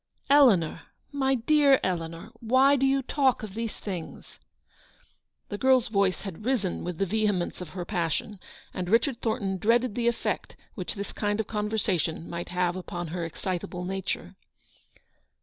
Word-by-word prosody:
" - - -36
Eleanor, 190 - +4 0.3
my 270 -2 +1
dear 275 +2 +4
Eleanor! 170 +2 -3
why 260 +5 +5
do 270 0 +2
you 270 0 +2
talk 265 -3 +1
of 210 -3 -6
these 225 0 -4
things? 180 -6 -7 0.6
" - - -38
The 205 - -4
girl's 260 -2 +4
voice 200 -3 +1
had 195 -1 -7
risen 220 -7 0
with 175 -1 -4
the 195 - +1
vehemence 205 -3 0
of 180 - -6
her 175 - -3
passion, 175 +2 -2 0.3
and 180 -1 -3
Kichard 235 +5 +2
Thornton 195 -4 -1
dreaded 235 +3 +2
the 235 +1 0
effect 235 - -1 0.2
which 185 -4 -5
this 200 0 -5
kind 205 0 -1
of 220 - 0
conversation 210 -7 -1
might 170 0 -5
have 180 0 0
upon 175 -2 -5
her 170 +1 -3
excitable 180 +1 -4
nature. 190 0 -3
205 Hz, 160 wpm, -27 LUFS, 180-235 Hz, 0.6 s, why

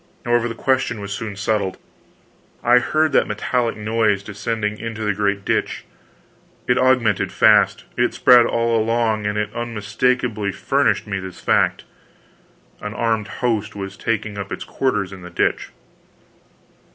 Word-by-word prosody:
However, 120 0 +2
the 115 - -5
question 130 -2 0
was 100 0 -7
soon 105 0 -5
settled. 100 -2 -1 0.9
I 120 +1 +6
heard 155 +4 +1
that - - +3
metallic 115 +3 -1
noise 105 -2 +1
descending 105 +1 -3
into 115 -1 -5
the 105 - +1
great 100 0 -1
ditch. - - -1 0.8
It 125 - +3
augmented 125 -5 +2
fast, - - +4
it - - +1
spread 120 -2 +6
all 115 0 +1
along, 110 -1 +1
and 105 0 -2
it 105 0 -2
unmistakably 115 -1 -1
furnished - - +1
me 100 -2 -3
this 95 -1 -8
fact: - - +1 1.0
an 105 +1 -6
armed 115 -2 0
host 110 -2 -2
was 100 -1 -6
taking 110 -1 -3
up 100 - -6
its - - -4
quarters 105 -8 -1
in 95 - -10
the 90 - -9
ditch. 90 - -1
110 Hz, 145 wpm, -21 LUFS, 100-120 Hz, 1.0 s, I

